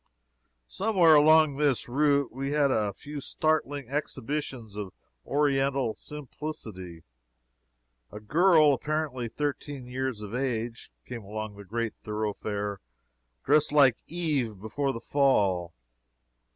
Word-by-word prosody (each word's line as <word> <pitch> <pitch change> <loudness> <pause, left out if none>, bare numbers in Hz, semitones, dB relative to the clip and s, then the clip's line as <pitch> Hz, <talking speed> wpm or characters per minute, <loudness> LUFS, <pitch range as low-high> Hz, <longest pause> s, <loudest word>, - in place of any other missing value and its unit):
Somewhere 185 - +4
along 155 -1 +6
this 145 -4 +1
route 140 +1 +2
we 135 +2 -3
had 145 -2 +3
a 105 -4 +1
few 145 +6 -8
startling 145 -3 -1
exhibitions 135 -4 -4
of 100 -3 -6 0.3
Oriental 135 -4 +1
simplicity. 115 - -8 1.1
A 105 - -8
girl 155 - +5
apparently 145 -3 -2
thirteen 145 0 -4
years 125 -2 -3
of 105 +1 -8
age 120 - -3
came 120 -2 -7
along 110 +1 -6
the 100 - -10
great 115 +3 -3
thoroughfare 105 -1 -3 0.6
dressed 150 +2 +3
like 140 -5 +5
Eve 145 - -1
before 135 +7 -2
the 115 - -5
fall. 100 - +2
135 Hz, 110 wpm, -28 LUFS, 110-150 Hz, 1.1 s, along